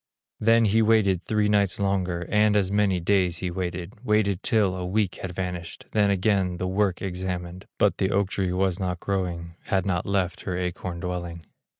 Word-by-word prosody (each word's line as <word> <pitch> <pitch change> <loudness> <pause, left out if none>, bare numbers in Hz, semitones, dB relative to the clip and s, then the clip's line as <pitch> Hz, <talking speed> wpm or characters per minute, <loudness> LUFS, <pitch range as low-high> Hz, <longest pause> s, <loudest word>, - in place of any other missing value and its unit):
Then 115 +1 +4
he 110 +2 +3
waited 105 -5 +3
three 105 -1 +1
nights 100 -2 +2
longer, 90 -3 0
And 105 0 +3
as 100 -2 +2
many 100 -3 +2
days 90 -1 +2
he 90 0 -3
waited, 90 +4 -5
Waited 105 -4 +1
till 105 -7 +2
a 90 - -4
week 95 +1 0
had 95 - -4
vanished, 90 -2 -5
Then 105 -2 +3
again 95 -2 +1
the 90 - -3
work 95 0 0
examined; 90 -1 -4
But - - +2
the 95 - +1
oak 100 -1 +1
tree 95 -2 -1
was 95 0 0
not 90 -2 -2
growing, 85 -4 -3
Had 95 -1 0
not 90 -3 -1
left 95 -3 0
her 90 -2 -3
acorn 90 -1 -4
dwelling. 85 -2 -5
95 Hz, 185 wpm, -25 LUFS, 90-100 Hz, -, Then